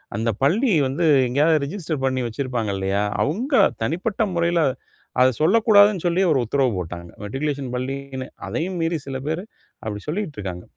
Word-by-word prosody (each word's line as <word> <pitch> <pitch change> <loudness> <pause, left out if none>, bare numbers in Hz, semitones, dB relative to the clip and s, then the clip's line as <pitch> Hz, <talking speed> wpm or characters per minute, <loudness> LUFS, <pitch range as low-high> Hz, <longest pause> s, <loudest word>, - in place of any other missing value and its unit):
அந்த 115 +2 0
பள்ளி 215 - +3 0.2
வந்து 145 +6 -1 0.2
எங்கேயாவது 150 +5 +3
ரிஜிஸ்டர் 155 -4 -4
பண்ணி 130 -1 0
வச்சிருப்பாங்க 120 -2 -3
இல்லையா, 95 +1 0 0.2
அவுங்க 235 - -2 0.3
தனிப்பட்ட 180 - -2
முறையில 170 0 +2 0.6
அத 130 - +6
சொல்லக்கூடாதுனு 205 +1 +5
சொல்லி 175 +2 +2
ஒரு 140 - +3
உத்தரவு 130 +1 +1
போட்டாங்க. 85 -1 -6
மெட்ரிகுலேஷன் 135 +3 -3
பள்ளினு 130 0 -4 0.2
அதையும் 180 +3 -3
மீறி 165 0 0
சில 130 -1 -4
பேர் 160 +3 -1 0.4
அப்டி 105 -1 -4
சொல்லிக்கிட்டு 165 - -3
இருக்காங்க. 90 -2 -6
140 Hz, 145 wpm, -22 LUFS, 125-175 Hz, 0.6 s, அத